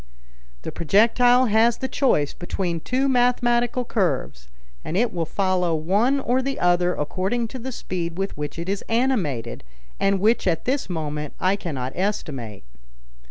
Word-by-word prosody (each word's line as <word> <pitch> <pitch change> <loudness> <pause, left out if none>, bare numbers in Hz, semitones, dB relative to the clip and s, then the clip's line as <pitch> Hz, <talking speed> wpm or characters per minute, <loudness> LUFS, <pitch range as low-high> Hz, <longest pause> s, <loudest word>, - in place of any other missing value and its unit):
"The - - -4
projectile 235 - +4
has 225 +1 +3
the 265 - -3
choice 245 - +1
between 175 -1 -3
two 260 - 0
mathematical 245 -1 +2
curves, 130 - -1 0.4
and 175 - -3
it 235 +3 +1
will 165 -3 -2
follow 185 -3 +1
one 205 - +2
or 255 0 +1
the 275 +1 -3
other 175 0 +2
according 190 +10 -1
to 260 - -7
the 260 +3 -5
speed 175 -7 -4
with 195 +1 -2
which 150 +1 -5
it 170 +1 -5
is 195 +1 -2
animated, 225 - 0 0.4
and 195 0 +2
which 215 +1 +2
at 165 -3 0
this 265 -3 -1
moment 150 -3 -4
I 185 +2 +2
cannot 135 -10 -4
estimate." 135 - -3
195 Hz, 155 wpm, -23 LUFS, 165-240 Hz, 0.4 s, projectile